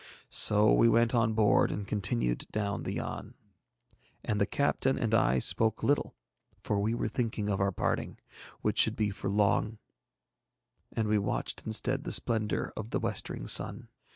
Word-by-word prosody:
So 105 0 +5
we 115 - +4
went 115 +1 +2
on 115 -2 +2
board 105 -2 +3
and 100 -1 -5
continued 100 - -1
down 100 -2 -2
the - - -4
Yann. - - -6 0.9
And 105 -1 -1
the 100 - +2
captain 135 -1 0
and 115 -1 -2
I 65 - +3
spoke 110 - +2
little, 145 +1 0 0.5
for 105 - -1
we 110 +3 0
were - - -2
thinking 115 -4 -3
of 100 -1 -1
our 100 0 +1
parting, 90 - -2 0.4
which - - 0
should - - +4
be 105 -1 -1
for 100 - -5
long, 105 +2 +1 1.1
and 110 -1 -2
we 105 0 +2
watched 100 - -4
instead 130 +5 -1
the - - -5
splendour 110 -3 -2
of 110 0 -6
the - - -1
westering - - -4
sun. - - +2
110 Hz, 165 wpm, -29 LUFS, 100-115 Hz, 1.1 s, So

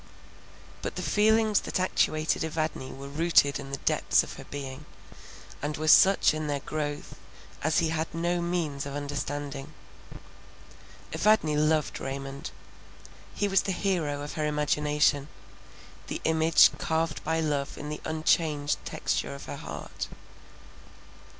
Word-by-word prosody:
But - - -4
the - - -4
feelings 215 0 +3
that - - -3
actuated 155 -4 +1
Evadne 155 -4 -3
were 135 +1 -8
rooted 145 -1 +3
in 140 -1 -8
the 140 - -3
depths - - +2
of - - -8
her - - -9
being, 140 0 -7 0.8
and 150 +1 -2
were 155 +1 -3
such 190 +3 +6
in 155 0 -3
their 145 -1 -1
growth 145 -1 -4 0.5
as 155 +2 +2
he 165 -2 +2
had 160 0 -2
no 170 +1 -1
means 165 -5 -2
of 140 - -6
understanding. 145 0 -4 1.4
Evadne 210 -8 +3
loved 155 0 +1
Raymond. 135 0 -5 0.9
He 205 - +1
was 195 -1 +3
the 195 - -2
hero 170 -7 -1
of 145 - -6
her 155 -1 -1
imagination, 150 -1 +1 0.8
the - - -4
image 160 0 +5
carved 160 -1 -1
by 160 +1 0
love 145 -3 -1
in 150 - -6
the 150 - -5
unchanged 155 -2 +1
texture 70 +1 -2
of - - -9
her - - -6
heart. - - -6
150 Hz, 135 wpm, -28 LUFS, 145-165 Hz, 1.4 s, such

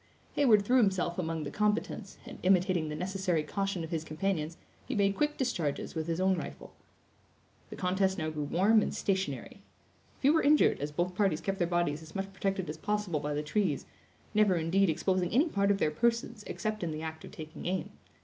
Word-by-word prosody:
Heyward 220 -8 +4
threw 250 +4 +4
himself 190 -6 +2
among 165 -2 -2
the 145 - -5
combatants, 210 -1 -1
and - - -9
imitating 180 -3 +3
the 150 - -4
necessary 180 -2 -1
caution 195 0 -2
of 160 - -7
his 160 -2 -1
companions, 160 0 -2 0.3
he - - -2
made 200 -1 +2
quick 295 +4 0
discharges 170 - -1
with 160 -1 -3
his 165 0 -1
own 190 -1 +2
rifle. - - -8 1.0
The - - -7
contest 190 +1 +1
now 155 -2 -2
grew 150 -1 -3
warm 205 +8 +4
and - - -2
stationary. 190 -1 -2 0.6
Few 280 +3 +4
were 320 - +4
injured, 295 +1 +4
as 145 +2 -3
both 175 +4 -1
parties 190 -5 +1
kept 195 0 -3
their 175 - +2
bodies 175 -3 0
as 160 0 -13
much 195 0 -3
protected 195 -2 -1
as 150 +1 -5
possible 210 -3 -1
by 150 0 -2
the 150 - -1
trees; 155 -2 0 0.5
never, 210 -3 +4
indeed, 175 +4 +2
exposing 180 +2 +1
any 270 +8 +4
part 200 -8 +1
of 200 - +3
their 155 - +1
persons 230 +4 0
except 215 0 -3
in 170 - -1
the 155 0 -4
act 160 0 -6
of - - -9
taking 155 +1 -8
aim. 185 +1 -2
185 Hz, 200 wpm, -31 LUFS, 160-200 Hz, 1.0 s, Heyward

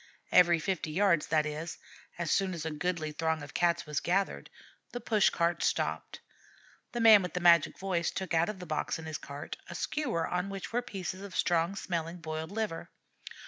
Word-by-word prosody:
Every 175 -2 +6
fifty 165 0 -2
yards, 170 -1 +2
that 155 -1 +2
is, 155 +2 -5 0.4
as 170 -2 -2
soon 190 -2 +1
as 160 -2 -5
a 160 - -2
goodly 155 0 -2
throng 160 0 -1
of 145 - -10
Cats 175 -1 +1
was 150 -1 -1
gathered, 195 +2 -1 0.4
the 245 - -3
push 220 -3 +3
cart 170 -1 0
stopped. - - -1 0.7
The 240 - -3
man 220 -3 +8
with 180 -1 -5
the - - +1
magic 170 -3 +5
voice 185 -3 -1
took 190 -3 -4
out 165 +3 +3
of 210 - -5
the 180 - -8
box 155 0 -2
in 160 - -9
his 155 -1 -4
cart 140 +1 -7
a - - -7
skewer 245 - -1
on 180 +2 -2
which 195 +2 -6
were 245 - +2
pieces 190 -4 -5
of 200 -2 -8
strong 170 +2 +1
smelling 170 -3 -3
boiled 160 -1 -5
liver. 210 -5 -3
175 Hz, 195 wpm, -30 LUFS, 160-195 Hz, 0.7 s, man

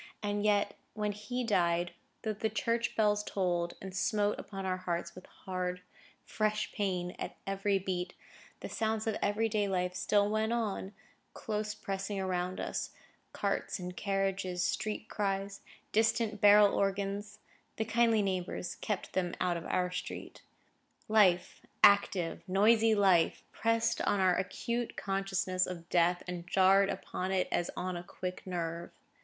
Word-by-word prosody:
And 205 0 -1
yet, 205 -1 +2 0.2
when 210 -1 0
he 210 +5 -4
died, 175 -5 +1 0.3
though 220 - -1
the 220 +1 -1
church 230 +2 -1
bells 210 -1 +3
tolled, 175 -4 -1
and 190 -1 -8
smote 210 +1 +1
upon 195 -2 -6
our 185 -1 0
hearts 175 -1 -3
with 185 - -12
hard, 180 -1 -4 0.4
fresh 215 0 -1
pain 180 -3 -2
at - - -5
every 195 0 +1
beat, 180 -1 -3 0.5
the - - -4
sounds 220 -1 -1
of 220 -2 0
every 210 +2 +1
day 210 -2 0
life 180 -2 0
still 200 +3 +2
went 215 +2 0
on, 210 -4 -2 0.4
close 215 0 -3
pressing 195 0 -3
around 185 -1 -2
us,—carts - - -4
and 180 -1 -6
carriages, 195 -2 -1
street 215 0 -2
cries, 195 -1 -2 0.3
distant 225 0 +1
barrel 205 -1 +7
organs 200 +1 -1 0.4
(the 220 - -1
kindly 230 -1 +3
neighbours 185 -2 -2
kept 210 -3 -3
them 180 -2 -1
out 180 -1 +1
of 170 - -5
our 180 0 0
street): 180 - -6 0.7
life, 200 -5 +3 0.2
active, 190 -4 +4
noisy 220 +4 +4
life, 190 -5 +3
pressed 230 0 +1
on 200 - +1
our 185 -1 +4
acute 235 +5 -2
consciousness 195 -2 0
of 170 -2 -7
Death, 175 0 +3
and 175 -1 -5
jarred 195 +1 +5
upon 185 +1 -3
it 190 -1 +1
as 175 - 0
on 185 0 -2
a 175 - -4
quick 180 +1 -6
nerve. 170 -1 -3
195 Hz, 145 wpm, -32 LUFS, 180-210 Hz, 0.7 s, barrel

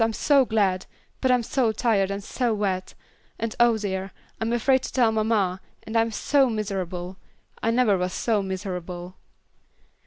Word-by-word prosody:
I'm 225 0 0
so 275 +3 +4
glad, 200 -5 +1 0.3
but 260 - +2
I'm 250 -1 +3
so 235 -1 +1
tired 215 -3 +1
and 200 0 -4
so 240 +1 -1
wet, 190 -3 -2 0.4
and 225 -1 -3
oh 240 -1 +5
dear 195 -2 -3 0.3
I'm 225 +1 -1
afraid 260 +3 +3
to - - -6
tell 240 -4 +3
mamma, 215 -4 +1 0.2
and 220 - -7
I'm 225 0 +3
so 270 +4 +2
miserable. 190 -4 -4 0.4
I 225 - +1
never 230 -5 +3
was 180 0 -1
so 215 +1 0
miserable." 185 -2 -5
215 Hz, 160 wpm, -25 LUFS, 190-230 Hz, 0.4 s, oh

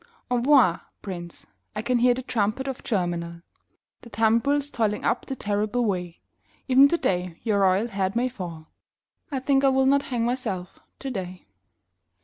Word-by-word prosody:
Envoi 245 - +4 0.2
Prince, 175 -3 -7 0.3
I 210 - -3
can 245 0 +1
hear 245 0 +4
the 260 - -5
trumpet 240 +1 -1
of 265 -2 -5
Germinal, 170 -4 -2 0.6
The 235 - -13
tumbrils 255 +7 +1
toiling 215 -4 -1
up - - 0
the 270 - -3
terrible 210 +2 -1
way; 180 -4 -3 0.5
Even 265 +1 +7
today 180 - -1
your 215 -3 +1
royal 195 +2 +3
head 195 -2 -2
may 245 +2 +2
fall 175 -10 -8 0.6
I 275 - -1
think 270 +1 +2
I 275 - +6
will 265 0 +3
not 280 +1 +4
hang 240 -3 0
myself 215 -7 -3 0.2
today. 190 -9 -6
225 Hz, 150 wpm, -25 LUFS, 185-260 Hz, 0.6 s, Even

